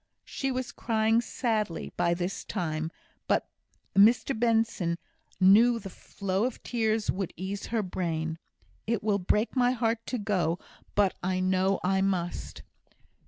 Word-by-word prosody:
She 270 -1 -2
was 255 -1 -3
crying 225 0 +2
sadly 220 -7 -2
by 170 0 +2
this 180 +2 -3
time, 160 -5 -2 0.4
but - - +1 0.5
Mr 225 +7 +5
Benson 225 -7 +1 0.4
knew 220 +6 +6
the 195 -4 -8
flow 195 +3 -2
of 255 - -4
tears 220 -3 0
would 195 -2 -3
ease 195 +3 -4
her 225 -2 0
brain. 165 -3 -2 0.5
"It 230 -2 0
will 205 -2 +2
break 210 +7 +1
my 250 -1 +3
heart 230 -2 0
to 250 - -1
go, 185 -6 0 0.4
but 200 -2 +3
I 185 +1 0
know 185 +1 +2
I 190 +1 +2
must." 180 -3 -2
200 Hz, 140 wpm, -28 LUFS, 185-230 Hz, 0.5 s, knew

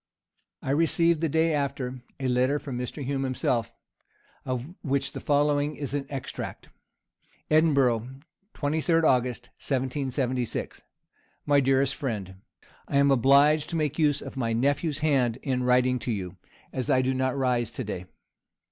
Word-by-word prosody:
I 130 - -1
received, 165 +2 +2
the 165 - +1
day 160 +2 +2
after, 135 -3 -2 0.2
a 130 - -1
letter 130 +3 +2
from 140 -3 -6
Mr. 125 +3 -4
Hume 135 0 -1
himself, 125 -3 -1 0.7
of 130 +5 -4
which 140 -1 -1
the - - -6
following 145 0 +1
is 140 -2 -5
an 145 -1 -2
extract: 135 -3 -6 0.8
"Edinburgh, 135 -7 +3 0.5
23d 160 +3 +1
August, 125 -3 +1
1776. 130 -2 -2 0.6
"MY 145 -1 +4
DEAREST 135 0 +2
FRIEND, 105 - -4 0.5
"I 140 - 0
am 140 0 +5
obliged 140 +4 +4
to - - -3
make 155 -1 -1
use 145 -2 +2
of - - -8
my 115 -4 -1
nephew's 140 +5 0
hand 130 -6 +2
in 130 -3 0
writing 125 0 +3
to 120 - -3
you, 95 -4 -4 0.4
as 130 +2 -2
I 130 -2 +4
do 130 +1 +1
not 130 +1 0
rise 125 -4 +1
to 130 - -5
day. 95 -4 -5
135 Hz, 145 wpm, -27 LUFS, 125-145 Hz, 0.8 s, am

